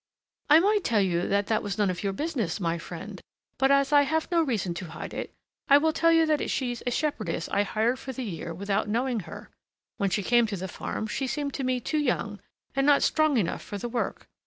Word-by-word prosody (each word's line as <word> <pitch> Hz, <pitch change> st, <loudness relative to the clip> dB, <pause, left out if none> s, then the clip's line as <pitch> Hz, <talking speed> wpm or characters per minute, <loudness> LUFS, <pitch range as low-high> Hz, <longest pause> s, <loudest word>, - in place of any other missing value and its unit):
"I 300 Hz, +2 st, +8 dB
might 410 Hz, +2 st, +2 dB
tell 220 Hz, -3 st, +2 dB
you 175 Hz, -2 st, 0 dB
that 200 Hz, 0 st, +1 dB
that 215 Hz, +1 st, +1 dB
was 200 Hz, -1 st, -4 dB
none 205 Hz, -3 st, +2 dB
of 175 Hz, -, -5 dB
your 200 Hz, -, -1 dB
business, 240 Hz, -, -2 dB
my 170 Hz, -2 st, -1 dB
friend, 185 Hz, +4 st, -8 dB, 0.4 s
but 270 Hz, +1 st, +4 dB
as 275 Hz, +1 st, +3 dB
I 290 Hz, -, +8 dB
have 315 Hz, +4 st, -1 dB
no 340 Hz, -1 st, +4 dB
reason 220 Hz, -, -1 dB
to 175 Hz, +2 st, -6 dB
hide -, -, -7 dB
it, -, -, -5 dB, 0.4 s
I 280 Hz, -, +9 dB
will 315 Hz, +2 st, +2 dB
tell 330 Hz, +1 st, +3 dB
you 330 Hz, -1 st, +5 dB
that 305 Hz, -1 st, 0 dB
she's 245 Hz, -3 st, -2 dB
a -, -, +4 dB
shepherdess 245 Hz, -, -2 dB
I 200 Hz, -, +2 dB
hired 225 Hz, +5 st, 0 dB
for 265 Hz, -, -6 dB
the 260 Hz, 0 st, -5 dB
year 170 Hz, -4 st, -5 dB
without 200 Hz, +4 st, -1 dB
knowing 240 Hz, +2 st, 0 dB
her. -, -, -10 dB, 0.5 s
When 200 Hz, -, +1 dB
she 200 Hz, +2 st, -1 dB
came 240 Hz, +3 st, +4 dB
to 205 Hz, -2 st, -4 dB
the 190 Hz, +1 st, -4 dB
farm, 215 Hz, -, -4 dB
she 260 Hz, +5 st, -2 dB
seemed 285 Hz, +1 st, -3 dB
to 275 Hz, -, -3 dB
me 255 Hz, -1 st, 0 dB
too 305 Hz, +5 st, -1 dB
young 230 Hz, -7 st, -1 dB, 0.4 s
and 275 Hz, +1 st, +2 dB
not 290 Hz, -1 st, +5 dB
strong 310 Hz, -3 st, +3 dB
enough 195 Hz, -7 st, -1 dB
for 205 Hz, -, -6 dB
the 240 Hz, +4 st, -4 dB
work. 240 Hz, 0 st, -3 dB
235 Hz, 235 wpm, -27 LUFS, 200-285 Hz, 0.5 s, I